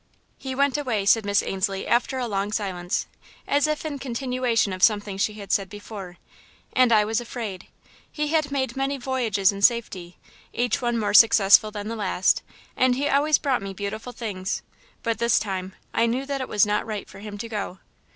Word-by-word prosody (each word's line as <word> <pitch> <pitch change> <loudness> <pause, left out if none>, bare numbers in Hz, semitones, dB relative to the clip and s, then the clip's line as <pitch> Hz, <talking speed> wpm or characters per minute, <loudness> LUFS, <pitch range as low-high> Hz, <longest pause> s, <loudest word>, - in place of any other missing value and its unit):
"He 265 -1 -5
went 280 +1 +2
away," 230 -8 -1
said 220 +1 +4
Miss 200 0 +2
Ainslie, 195 0 -2
after 245 +2 +1
a 255 - -1
long 200 -1 -2
silence, 185 -4 -2 0.4
as 290 +1 +2
if 305 +1 -2
in 290 -3 -4
continuation 250 -4 0
of 185 - -6
something 205 -2 +3
she 205 +2 0
had 205 -2 -8
said 195 -2 +1
before, 205 -4 -9 0.6
"and 255 -2 +4
I 215 -2 +5
was 225 +2 0
afraid. 220 -6 -6 0.4
He 300 -1 -2
had 310 -2 +1
made 260 -4 -1
many 270 +1 -1
voyages 235 -7 +1
in 200 0 -7
safety, 200 -6 +1 0.4
each 245 0 0
one 240 -1 0
more 215 -2 -1
successful 215 -1 +7
than 210 -1 -6
the 230 - -3
last, 190 -3 +1 0.3
and 255 -1 +3
he 285 +3 0
always 290 +2 +3
brought 265 -6 0
me 195 -1 -6
beautiful 215 +5 -5
things, 205 -6 -4 0.4
but, 230 -2 -1
this 235 0 +3
time, 190 -2 -3 0.2
I 230 - +2
knew 255 +4 -1
that 275 -1 -3
it 260 - -5
was 210 -1 +4
not 210 +1 -1
right 210 -2 -5
for 190 - -13
him 205 0 -8
to 230 - -5
go." 205 -4 -5
220 Hz, 195 wpm, -24 LUFS, 200-255 Hz, 0.6 s, successful